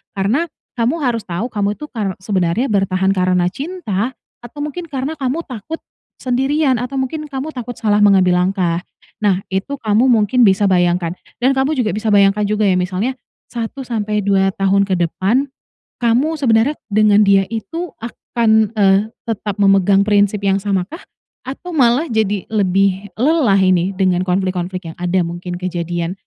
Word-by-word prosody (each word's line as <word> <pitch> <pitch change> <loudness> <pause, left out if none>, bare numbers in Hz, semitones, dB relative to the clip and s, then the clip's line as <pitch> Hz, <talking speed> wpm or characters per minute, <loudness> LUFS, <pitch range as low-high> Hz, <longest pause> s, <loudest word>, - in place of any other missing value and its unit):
Karena, 225 - 0 0.3
kamu 250 +8 0
harus 240 -5 -1
tahu 180 +8 -3
kamu 205 -1 -1
itu 300 +6 -9
kar 205 -5 -3
sebenarnya 190 +5 0
bertahan 190 -2 +1
karena 180 -2 +2
cinta, 260 - -3 0.3
atau 290 +5 -9
mungkin 320 +4 -5
karena 285 +1 -4
kamu 275 +4 -2
takut 255 +7 -6 0.4
sendirian, 265 +2 +1
atau 255 +3 -3
mungkin 305 +4 -4
kamu 280 +1 -5
takut 245 -4 -6
salah 210 -2 +2
mengambil 190 -3 +4
langkah. 180 -3 -1 0.3
Nah, 195 -3 +1
itu 190 +9 -3
kamu 220 +3 +2
mungkin 235 0 +4
bisa 195 0 +3
bayangkan, 175 -1 +1 0.2
dan 265 +2 +2
kamu 270 +4 +1
juga 215 - 0
bisa 215 -1 0
bayangkan 200 +1 +4
juga 210 +1 -1
ya. 185 - +2
Misalnya, 190 +8 -2 0.3
1 235 +3 -5
sampai 215 -4 -2
2 195 -1 +2
tahun 195 +1 +2
ke 190 - -2
depan, 210 - 0 0.5
kamu 255 +7 +1
sebenarnya 250 +2 +2 0.2
dengan 210 -1 +5
dia 195 -1 +3
itu 330 - -5
akan, 220 -2 0
eee, 195 -1 +5 0.3
tetap 210 -3 -3
memegang 195 0 +4
prinsip 205 0 +2
yang 195 0 +2
samakah, 200 - -2 0.5
Atau 350 +7 -7
malah, 260 +2 +3
jadi 210 -3 0
lebih 195 -1 +1
lelah 270 -5 +2
ini 185 0 +2
dengan 185 -2 +2
konflik-konflik 185 -1 -2
yang - - -17
ada, 180 0 +1
mungkin, 175 +1 -6
kejadian 175 -1 -3
205 Hz, 155 wpm, -17 LUFS, 190-250 Hz, 0.5 s, dengan